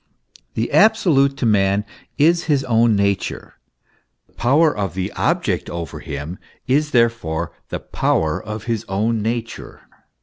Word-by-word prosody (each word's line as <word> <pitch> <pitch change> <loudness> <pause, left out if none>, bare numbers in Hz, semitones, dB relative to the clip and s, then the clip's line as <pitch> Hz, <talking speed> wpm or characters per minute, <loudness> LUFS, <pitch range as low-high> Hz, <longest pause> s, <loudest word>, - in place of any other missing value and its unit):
The 115 - -1
absolute 160 -11 +4
to 130 - -1
man 100 -1 +2 0.3
is 170 +4 +3
his 145 -4 +1
own 115 -2 +3
nature. 100 -1 -2 0.7
The - - -33
power 145 +6 +3
of 100 -5 -3
the 95 +1 -2
object - - -1
over 85 -3 -6
him 75 +5 -6 0.3
is 145 +4 +1
therefore 115 - 0 0.2
the - - -4
power 80 -1 0
of 105 0 -6
his 115 -1 -2
own 110 +3 0
nature. 115 +1 -4
115 Hz, 135 wpm, -20 LUFS, 95-135 Hz, 0.7 s, absolute